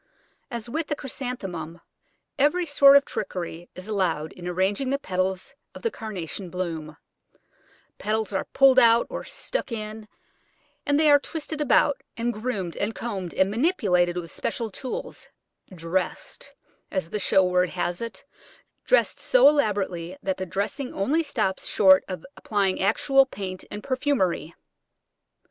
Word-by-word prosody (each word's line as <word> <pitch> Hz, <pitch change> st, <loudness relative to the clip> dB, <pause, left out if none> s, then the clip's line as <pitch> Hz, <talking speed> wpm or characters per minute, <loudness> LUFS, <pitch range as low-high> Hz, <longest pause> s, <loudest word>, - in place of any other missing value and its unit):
As 235 Hz, -2 st, -5 dB
with 310 Hz, +6 st, -2 dB
the 295 Hz, -, -1 dB
Chrysanthemum, 195 Hz, -, -5 dB, 0.6 s
every 300 Hz, +6 st, +3 dB
sort 280 Hz, -2 st, +7 dB
of 280 Hz, -, +2 dB
trickery 175 Hz, -3 st, -5 dB
is 185 Hz, +2 st, -8 dB
allowed 180 Hz, -7 st, -1 dB
in 175 Hz, -1 st, -8 dB
arranging 190 Hz, +8 st, 0 dB
the 275 Hz, -, +1 dB
petals 185 Hz, -3 st, -2 dB, 0.2 s
of -, -, -10 dB
the 460 Hz, -, 0 dB
Carnation 190 Hz, -, -6 dB
blooms: 165 Hz, -4 st, -4 dB, 1.0 s
petals 215 Hz, -1 st, -1 dB
are 190 Hz, -, -1 dB
pulled 270 Hz, -1 st, +5 dB
out 235 Hz, -1 st, +5 dB
or -, -, -4 dB
stuck -, -, -4 dB
in, 215 Hz, -1 st, -5 dB, 0.8 s
and 285 Hz, +1 st, +3 dB
they 310 Hz, -1 st, +5 dB
are 285 Hz, -, +7 dB
twisted 310 Hz, 0 st, -5 dB
about, 285 Hz, -1 st, +3 dB, 0.2 s
and 235 Hz, +1 st, -1 dB
groomed 210 Hz, -6 st, -3 dB
and 210 Hz, +2 st, -2 dB
combed, 195 Hz, -7 st, -5 dB
and 190 Hz, +1 st, +2 dB
manipulated 200 Hz, -, +2 dB
with 170 Hz, -2 st, -5 dB
special 230 Hz, -3 st, -3 dB
tools 255 Hz, +6 st, -6 dB, 0.4 s
"dressed," 180 Hz, +1 st, -3 dB, 0.3 s
as 185 Hz, -4 st, -3 dB
the 210 Hz, -, -2 dB
show 190 Hz, -1 st, +4 dB
word 180 Hz, 0 st, +2 dB
has 175 Hz, +1 st, -2 dB
it 230 Hz, -2 st, -6 dB, 0.6 s
dressed -, -, +3 dB
so -, -, +5 dB
elaborately 195 Hz, -, +1 dB
that 190 Hz, -1 st, -1 dB
the 185 Hz, -, -4 dB
dressing 205 Hz, -, -3 dB
only 280 Hz, +12 st, +1 dB
stops 220 Hz, -11 st, -2 dB
short 190 Hz, -1 st, +6 dB
of 185 Hz, -4 st, -6 dB
applying 200 Hz, -3 st, 0 dB
actual 270 Hz, +7 st, +4 dB
paint 185 Hz, -6 st, -6 dB
and 210 Hz, 0 st, -7 dB
perfumery. 255 Hz, -, 0 dB
205 Hz, 145 wpm, -25 LUFS, 185-265 Hz, 1.0 s, sort